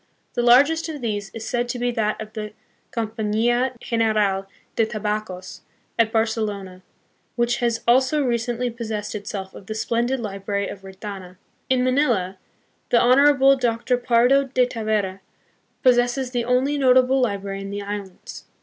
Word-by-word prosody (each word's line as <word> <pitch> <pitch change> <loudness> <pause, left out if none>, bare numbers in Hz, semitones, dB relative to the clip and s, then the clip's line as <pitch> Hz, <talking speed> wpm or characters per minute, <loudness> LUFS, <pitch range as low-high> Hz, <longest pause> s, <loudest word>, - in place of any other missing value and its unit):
The 240 - 0
largest 285 +7 +4
of 305 -2 -5
these 205 -5 -3
is 225 +1 -8
said 240 0 -1
to 245 - -2
be 245 0 0
that 215 -3 -1
of 215 0 -8
the 210 -1 -6 0.4
Compania 230 +3 0
General 215 -5 0 0.3
de 225 - +2
Tabacos, 210 -4 -4 0.4
at 225 -1 +3
Barcelona, 215 -5 -2 0.5
which 240 0 +1
has 235 -2 -1
also 260 +5 +3
recently 240 0 -1
possessed 220 -3 -5
itself 200 -2 -6
of 195 - -12
the 215 - -4
splendid 240 +4 0
library 200 -2 -3
of 195 - -8
Retana. 190 -1 -9 0.3
In 255 -1 +3
Manila 240 -9 +1 0.5
the 235 - +4
Honorable 275 +2 +5
Dr. 240 -1 0
Pardo 245 +3 +3
de 255 -1 +2
Tavera 215 -5 -2 0.6
possesses 245 +1 +3
the 240 -2 -1
only 260 +4 +1
notable 260 0 +4
library 200 -4 -2
in 195 - -6
the 200 0 -4
islands. 200 -2 -7
230 Hz, 145 wpm, -22 LUFS, 205-250 Hz, 0.6 s, Honorable